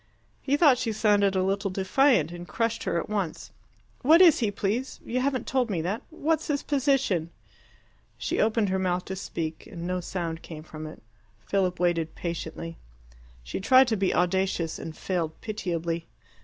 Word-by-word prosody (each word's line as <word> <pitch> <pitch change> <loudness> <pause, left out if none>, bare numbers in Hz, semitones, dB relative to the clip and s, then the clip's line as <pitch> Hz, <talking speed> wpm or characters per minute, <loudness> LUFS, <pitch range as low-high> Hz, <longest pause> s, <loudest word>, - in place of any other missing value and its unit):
He 280 +2 +1
thought 290 -6 +5
she 230 -3 -1
sounded 205 -2 +3
a 185 - +2
little 195 +1 0
defiant, 190 - +3
and 175 0 -8
crushed 230 0 -1
her 170 - +1
at - - -5
once. 200 -6 -3 0.5
"What 315 +6 +6
is 350 -5 +7
he, 225 -4 +1
please? 210 +6 -2
You 250 +2 -1
haven't 260 0 0
told 255 -3 0
me 185 -5 -1
that. 195 +6 -2
What's 320 -1 -1
his 285 -2 -1
position?" 270 - +1 0.9
She - - -2
opened 220 -2 +2
her 190 0 0
mouth 180 -1 0
to 190 - -4
speak, 165 -4 -5
and 170 -4 -7
no 180 +1 -1
sound 170 -2 -4
came 155 -2 -9
from 155 -1 -8
it. 155 - -11 0.4
Philip 185 - 0
waited 170 -3 0
patiently. 165 -1 -5 0.7
She - - -4
tried 260 +6 +6
to 225 - +2
be 195 -2 +1
audacious, 180 -2 0
and 160 - -7
failed 170 -4 -2
pitiably. 170 -6 -3
190 Hz, 170 wpm, -27 LUFS, 170-240 Hz, 0.9 s, is